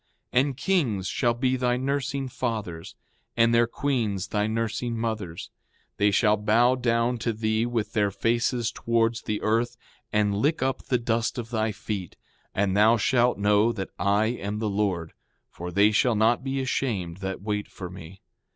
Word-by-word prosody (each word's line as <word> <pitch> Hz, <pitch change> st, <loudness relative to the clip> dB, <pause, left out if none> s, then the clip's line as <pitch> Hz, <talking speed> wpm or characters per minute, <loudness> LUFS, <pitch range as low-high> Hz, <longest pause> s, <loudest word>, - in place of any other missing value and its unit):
6:7 125 Hz, -, +5 dB
And 135 Hz, -2 st, -2 dB
kings 135 Hz, -, 0 dB
shall 120 Hz, +2 st, +1 dB
be 130 Hz, +1 st, +1 dB
thy 125 Hz, -1 st, +1 dB
nursing 140 Hz, +1 st, -2 dB
fathers, 110 Hz, -10 st, -4 dB, 0.4 s
and 115 Hz, 0 st, +4 dB
their 115 Hz, 0 st, +4 dB
queens 110 Hz, -8 st, -1 dB
thy 105 Hz, 0 st, 0 dB
nursing 115 Hz, +1 st, -2 dB
mothers; 110 Hz, -7 st, -4 dB, 0.5 s
they 105 Hz, 0 st, +4 dB
shall 105 Hz, +1 st, +3 dB
bow 115 Hz, +4 st, +3 dB
down 120 Hz, -1 st, +1 dB
to 115 Hz, -, 0 dB
thee 110 Hz, +1 st, 0 dB
with 115 Hz, -3 st, -2 dB
their 105 Hz, -2 st, +2 dB
faces 115 Hz, +3 st, 0 dB
towards 115 Hz, 0 st, 0 dB
the 105 Hz, -, -2 dB
earth, 115 Hz, +2 st, +1 dB, 0.3 s
and 105 Hz, -1 st, +2 dB
lick 140 Hz, +7 st, +1 dB
up 130 Hz, 0 st, -1 dB
the 125 Hz, -, +1 dB
dust 115 Hz, 0 st, -1 dB
of 120 Hz, -1 st, -5 dB
thy 110 Hz, -1 st, 0 dB
feet; 100 Hz, -3 st, -5 dB, 0.4 s
and 100 Hz, -1 st, +1 dB
thou 110 Hz, +3 st, +5 dB
shalt 120 Hz, +2 st, +2 dB
know 105 Hz, +2 st, +3 dB
that 95 Hz, -5 st, -5 dB
I 100 Hz, +2 st, +2 dB
am 105 Hz, -3 st, -3 dB
the 110 Hz, 0 st, -1 dB
Lord; 95 Hz, -5 st, -1 dB, 0.4 s
for 90 Hz, +1 st, -7 dB
they 100 Hz, +4 st, +4 dB
shall 115 Hz, +2 st, +3 dB
not 115 Hz, +4 st, +3 dB
be 135 Hz, 0 st, -2 dB
ashamed 105 Hz, -10 st, -2 dB
that 95 Hz, -1 st, -5 dB
wait 105 Hz, -1 st, -2 dB
for 90 Hz, -, -8 dB
me. 90 Hz, +1 st, -11 dB
110 Hz, 170 wpm, -26 LUFS, 105-120 Hz, 0.5 s, 6:7